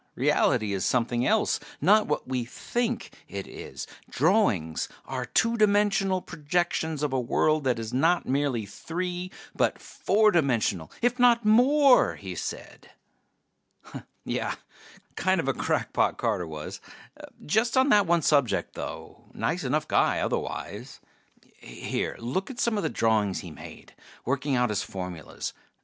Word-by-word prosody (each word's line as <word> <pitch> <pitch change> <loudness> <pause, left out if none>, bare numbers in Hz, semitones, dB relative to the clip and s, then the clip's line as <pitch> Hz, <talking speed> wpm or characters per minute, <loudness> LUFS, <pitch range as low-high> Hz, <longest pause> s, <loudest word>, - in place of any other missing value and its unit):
Reality 105 -2 +2
is 95 -2 -2
something 120 0 +1
else, - - +2 0.2
not 210 +7 +4
what 150 - -2
we 130 -1 -1
think 235 - -3
it 100 -1 -6
is. - - -8 0.2
Drawings 130 - +1 0.2
are 130 -2 -4
two 230 - +2
dimensional 200 -3 +2
projections 160 -1 -1
of 145 -3 -1
a 130 - +2
world 155 +4 +1
that 125 -3 +2
is 115 0 -5
not 165 +7 +2
merely 135 -5 0
three 180 - -4 0.3
but - - +1
four 215 +1 +2
dimensional, 120 - +1
if 245 +1 +2
not 240 -2 +5
more," 260 +5 +5
he - - -7
said. - - -7 1.4
Yeh, - - -2 0.6
kind 185 -1 +1
of 160 - -2
a 135 - +2
crackpot, - - 0
Carter 90 - -1
was. 75 -1 -7 0.6
Just 225 - +1
on 260 +2 +4
that 205 -5 +5
one 170 -1 +2
subject, 140 -6 +2
though; - - -8
nice - - -1
enough - - 0
guy - - +2
otherwise. 120 +7 -4 0.6
Here, 60 - -4
look 130 - -3
at 255 -3 -8
some 235 -2 +1
of 205 - 0
the - - -1
drawings 110 -4 +1
he 90 - -9
made, - - -12 0.3
working 140 +2 0
out 125 -1 +2
his 105 - 0
formulas. 90 -4 -6
150 Hz, 140 wpm, -27 LUFS, -, 1.4 s, not